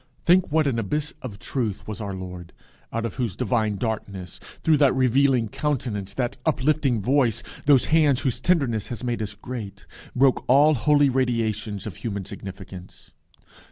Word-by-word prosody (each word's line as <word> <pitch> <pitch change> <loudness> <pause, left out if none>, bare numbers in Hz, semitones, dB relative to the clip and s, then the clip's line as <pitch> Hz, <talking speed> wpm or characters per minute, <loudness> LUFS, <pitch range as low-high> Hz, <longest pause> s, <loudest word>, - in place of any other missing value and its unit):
Think 180 -1 +4
what 155 0 +3
an 125 -5 0
abyss 150 +8 -2
of 115 -7 -7
truth 110 -3 -3
was 110 +1 -5
our 100 -2 -4
Lord, 90 -2 -8 0.4
out 115 0 -2
of 115 - -5
whose 120 -8 -2
divine 110 -3 0
darkness, 100 -4 -4 0.2
through 160 -2 +4
that 140 -3 +4
revealing 130 -1 +3
countenance, 105 -7 -3
that 125 -2 -2
uplifting 140 -6 +1
voice, 120 -3 +2 0.2
those 140 -4 +6
hands 150 -5 +4
whose 130 -4 -1
tenderness 135 - +1
has 120 0 -6
made 120 -2 -2
us 105 -1 -4
great, 100 -5 -7 0.3
broke 130 0 +3
all 145 +5 +6
holy 145 +3 +3
radiations 115 -5 -1
of 105 -7 -7
human 100 -5 -4
significance. 95 -1 -10
120 Hz, 155 wpm, -24 LUFS, 105-140 Hz, 0.4 s, those